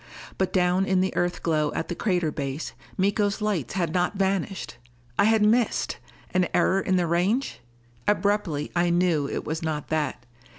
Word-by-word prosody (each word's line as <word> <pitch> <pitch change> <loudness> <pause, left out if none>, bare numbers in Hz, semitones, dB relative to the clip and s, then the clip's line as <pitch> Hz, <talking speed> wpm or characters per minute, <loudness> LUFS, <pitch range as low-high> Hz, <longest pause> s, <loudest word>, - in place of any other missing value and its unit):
But 190 - +1
down 180 +1 +2
in 190 -1 +3
the 190 - -1
Earth 175 0 -1
glow 155 -3 +1
at 165 - -2
the - - -3
crater 175 -5 0
base, 140 +1 -4 0.2
Miko's 200 +2 +1
lights 195 - -1
had 170 -4 0
not 180 +3 +1
vanished! 195 -1 -1 0.4
I - - +6
had 220 -1 +4
missed! 225 +2 +2 0.4
An 185 -1 +3
error 195 +1 +3
in 185 - +1
the 180 -1 +2
range? 185 +10 0 0.5
Abruptly 200 -7 +1
I 175 0 +3
knew 170 -5 +2
it - - -4
was 160 +1 -3
not 155 -3 -3
that. 150 -5 -1
180 Hz, 170 wpm, -25 LUFS, 160-200 Hz, 0.5 s, I